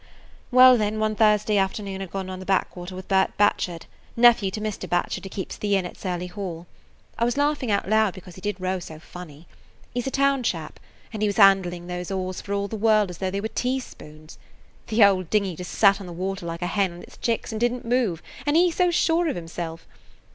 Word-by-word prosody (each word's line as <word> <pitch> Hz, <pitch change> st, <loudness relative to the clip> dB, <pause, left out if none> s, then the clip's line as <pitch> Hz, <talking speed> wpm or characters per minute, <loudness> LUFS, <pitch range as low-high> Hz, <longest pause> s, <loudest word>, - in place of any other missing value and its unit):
"Well, 255 Hz, -1 st, +7 dB
then, 210 Hz, 0 st, -1 dB
one 215 Hz, 0 st, +1 dB
Thursday 210 Hz, -1 st, +3 dB
afternoon 195 Hz, 0 st, -2 dB
I -, -, -3 dB
'd -, -, -25 dB
gone 195 Hz, -1 st, -4 dB
on 185 Hz, 0 st, -6 dB
the -, -, -7 dB
back 195 Hz, -1 st, +1 dB
water 180 Hz, +1 st, -7 dB
with 185 Hz, 0 st, -8 dB
Bert 190 Hz, -1 st, +1 dB
Batchard, 180 Hz, -4 st, +1 dB, 0.3 s
nephew 230 Hz, -4 st, +5 dB
to 200 Hz, -, -5 dB
Mr. 210 Hz, -3 st, -4 dB
Batchard 175 Hz, +1 st, -1 dB
who -, -, -6 dB
keeps 190 Hz, -1 st, -6 dB
the 205 Hz, -1 st, 0 dB
inn 190 Hz, -2 st, 0 dB
at 175 Hz, -, -7 dB
Surly 180 Hz, -2 st, -4 dB
Hall. 180 Hz, -3 st, -6 dB, 0.5 s
I -, -, +1 dB
was 240 Hz, +3 st, 0 dB
laughing 285 Hz, -4 st, 0 dB
out 200 Hz, -2 st, 0 dB
loud 215 Hz, -2 st, +2 dB
because 185 Hz, -1 st, -11 dB
he 185 Hz, -, -12 dB
did 205 Hz, -1 st, -3 dB
row 185 Hz, 0 st, -1 dB
so 160 Hz, -3 st, -9 dB
funny! 160 Hz, -1 st, -12 dB, 0.5 s
He 245 Hz, -, -1 dB
's 245 Hz, -, -6 dB
a -, -, +1 dB
town 275 Hz, 0 st, +2 dB
chap, 165 Hz, -9 st, -3 dB, 0.3 s
and 215 Hz, -, -5 dB
he 210 Hz, -, +2 dB
was 200 Hz, -, -3 dB
handling 190 Hz, -4 st, +4 dB
those 180 Hz, 0 st, -5 dB
oars 185 Hz, -1 st, -3 dB
for 200 Hz, -, -9 dB
all 200 Hz, 0 st, -1 dB
the 220 Hz, -, -5 dB
world 215 Hz, -2 st, +3 dB
as 175 Hz, -, -11 dB
though 190 Hz, -, -1 dB
they 200 Hz, +1 st, -3 dB
were 220 Hz, -, -2 dB
teaspoons. 220 Hz, -12 st, -5 dB, 0.5 s
The 220 Hz, 0 st, +4 dB
old 185 Hz, -4 st, +3 dB
dinghy 200 Hz, -4 st, +1 dB
just 180 Hz, +2 st, -7 dB
sat 200 Hz, -1 st, +4 dB
on 190 Hz, -, -8 dB
the 175 Hz, -, -7 dB
water 185 Hz, 0 st, -4 dB
like 170 Hz, +1 st, -5 dB
a -, -, 0 dB
hen 190 Hz, -1 st, 0 dB
on 175 Hz, -, -11 dB
its -, -, -15 dB
chicks 230 Hz, 0 st, -2 dB
and 220 Hz, 0 st, -4 dB
didn't 240 Hz, 0 st, 0 dB
move, 230 Hz, -9 st, 0 dB, 0.2 s
and 290 Hz, -, +2 dB
he 350 Hz, +1 st, +4 dB
so 360 Hz, +2 st, +2 dB
sure 335 Hz, 0 st, +2 dB
of -, -, -1 dB
himself! 165 Hz, -1 st, -6 dB
195 Hz, 235 wpm, -24 LUFS, 180-220 Hz, 0.5 s, Well